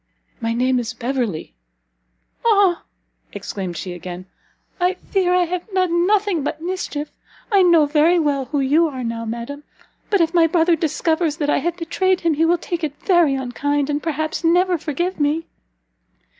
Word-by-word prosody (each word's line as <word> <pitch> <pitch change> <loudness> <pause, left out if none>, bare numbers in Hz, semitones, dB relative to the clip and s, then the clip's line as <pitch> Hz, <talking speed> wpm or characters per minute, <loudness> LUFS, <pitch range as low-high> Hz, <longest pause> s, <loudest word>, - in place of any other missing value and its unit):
"My 230 0 -1
name 255 +1 +2
is 235 -2 -4
Beverley." 235 - -3 0.9
"Ah!" 405 -6 +3 0.5
exclaimed 185 -4 -5
she 185 -2 -5
again, 180 +1 -8 0.5
"I 360 +1 +2
fear 370 -1 -1
I 360 - +4
have 360 +4 -5
done 360 -2 +1
nothing 405 -5 +2
but 290 - -3
mischief! 330 -4 -4 0.4
I 400 -2 +5
know 340 -4 +5
very 310 +4 +3
well 285 -4 0
who 285 +1 -1
you 300 +5 +3
are 260 -4 -5
now, 230 0 -3
madam, 235 +6 -6 0.5
but 405 - +2
if 330 0 +2
my 335 -2 +5
brother 335 +1 +3
discovers 320 0 0
that 295 -3 0
I - - +2
have 345 +1 -2
betrayed 370 +2 0
him, 335 -2 +2
he 320 +2 +2
will 345 +1 +3
take 345 0 -4
it 295 -2 -2
very 345 -7 +4
unkind, 285 +3 -1
and 290 +1 -1
perhaps 315 +1 -3
never 355 +2 +3
forgive 345 +5 -3
me." 300 +3 0
320 Hz, 170 wpm, -20 LUFS, 275-355 Hz, 0.9 s, I